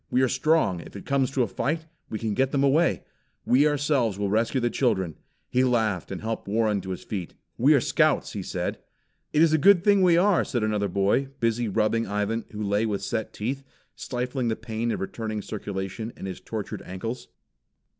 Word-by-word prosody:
We 130 - +2
are - - +4
strong, 155 - +2
if 85 - -11
it 100 - -8
comes 135 -2 +1
to 135 -2 +1
a - - -1
fight; 155 - -2 0.2
we 110 - -3
can 110 +1 -3
still 105 - -1
get 135 0 +1
them 140 -1 +1
away. 150 +5 +3 0.4
We 140 +4 +5
ourselves 145 -8 +1
will 100 -1 -1
rescue 115 +5 +1
the 120 -1 0
children." 95 - +1 0.3
He 125 - +2
laughed 110 -7 +1
and 95 - -5
helped 110 -1 -4
Warren 105 -1 +1
to 95 - -8
his 90 - -5
feet. 95 -5 -5 0.2
"We - - +5
are - - +5
Scouts," - - +2
he - - -3
said. - - -3 0.5
"It 150 - +4
is 160 -1 +4
a 155 - +4
good 185 +2 +6
thing 200 -1 +5
we 175 -2 +5
are," 190 +1 +4
said 120 -4 -2
another 105 -1 0
boy, 100 +8 +1
busy 115 0 +1
rubbing 110 +2 +1
Ivan 105 +3 -1
who 105 -1 -5
lay 105 +2 +1
with 100 -2 -2
set 110 -2 -2
teeth, 135 +6 -3 0.3
stifling 125 0 -3
the 110 - +1
pain 115 +1 -3
of - - -2
returning 110 +1 -4
circulation 100 +2 -5
in - - -7
his 95 -1 -5
tortured 110 -3 -5
ankles. 115 +7 -6
115 Hz, 205 wpm, -26 LUFS, 105-135 Hz, 0.5 s, good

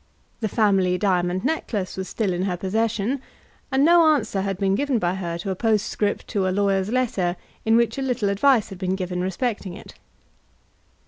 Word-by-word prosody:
The 220 - -1
family 195 -4 +2
diamond 180 0 0
necklace 225 -10 -2
was 190 -1 -5
still 205 -5 -1
in 175 - -2
her 180 -2 -1
possession, 220 +6 -1 0.5
and 265 +2 +3
no 340 +1 +6
answer 200 -8 -2
had 195 -1 -2
been 195 0 +1
given 275 +3 +1
by 175 -4 0
her 175 -3 -4
to 190 +3 -4
a - - -2
postscript 210 -1 0
to 195 -2 0
a - - +2
lawyer's 195 0 +1
letter 215 -9 0 0.3
in 225 0 +4
which 235 +3 +2
a - - -2
little 250 -6 0
advice 225 +3 +3
had 190 -3 -9
been 185 -1 -1
given 180 -1 -3
respecting 190 0 -2
it. - - -12
200 Hz, 185 wpm, -23 LUFS, 185-230 Hz, 0.5 s, no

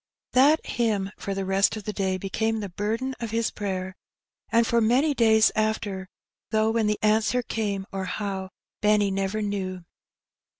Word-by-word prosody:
That 285 +5 +5
hymn 210 -5 0
for 195 - -4
the 195 0 -2
rest 195 +3 +2
of 215 - -7
the 210 - -4
day 190 -2 0
became 220 +4 -1
the 205 -2 -4
burden 225 +8 -2
of 230 - -4
his 225 +1 0
prayer, 190 -2 -4 0.6
and 230 0 +4
for 235 0 +2
many 260 +7 +3
days 220 -3 +5
after, 215 -3 -1 0.4
though 220 0 +2
when 225 -1 +1
the 210 0 +1
answer 220 +3 +2
came, 205 -4 -2
or 195 -1 -3
how, 190 0 -4 0.3
Benny 210 -1 +3
never 195 +2 -1
knew. 190 -3 -3
210 Hz, 165 wpm, -26 LUFS, 195-225 Hz, 0.6 s, That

